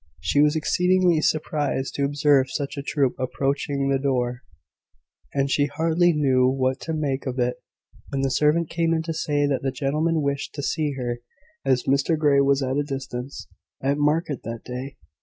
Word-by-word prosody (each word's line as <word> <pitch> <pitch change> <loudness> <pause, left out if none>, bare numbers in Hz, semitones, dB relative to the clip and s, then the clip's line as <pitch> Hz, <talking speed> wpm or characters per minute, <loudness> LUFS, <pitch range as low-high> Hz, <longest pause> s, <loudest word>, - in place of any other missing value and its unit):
She 145 - +2
was 150 +1 +4
exceedingly 180 +1 +2
surprised 150 -4 -1
to 140 - 0
observe 140 -2 +3
such 140 0 -3
a 140 - -4
troop 140 -2 0
approaching 140 +2 -1
the 135 -1 +2
door: 125 -3 -1 0.9
and 140 -1 +1
she 145 +1 +2
hardly 165 +3 +2
knew 135 -5 +3
what 130 0 0
to 160 - -4
make 140 -3 -2
of 130 0 -3
it 125 0 0 0.5
when 135 - -2
the 135 - +1
servant 155 +4 +2
came 165 -1 +1
in 160 - -1
to 165 0 -3
say 145 -2 0
that 140 -2 0
the 135 - 0
gentlemen 150 +4 0
wished 140 0 -2
to 145 - -4
see 150 -1 -1
her, 120 -2 -3 0.4
as 130 -2 +2
Mr 140 +4 +2
Grey 145 -2 +4
was 140 0 +2
at 130 +1 -1
a 145 - +1
distance 135 -2 -6 0.3
at 140 +2 0
market 150 -1 +1
that 115 0 -6
day. 130 +2 -6
140 Hz, 180 wpm, -24 LUFS, 135-150 Hz, 0.9 s, was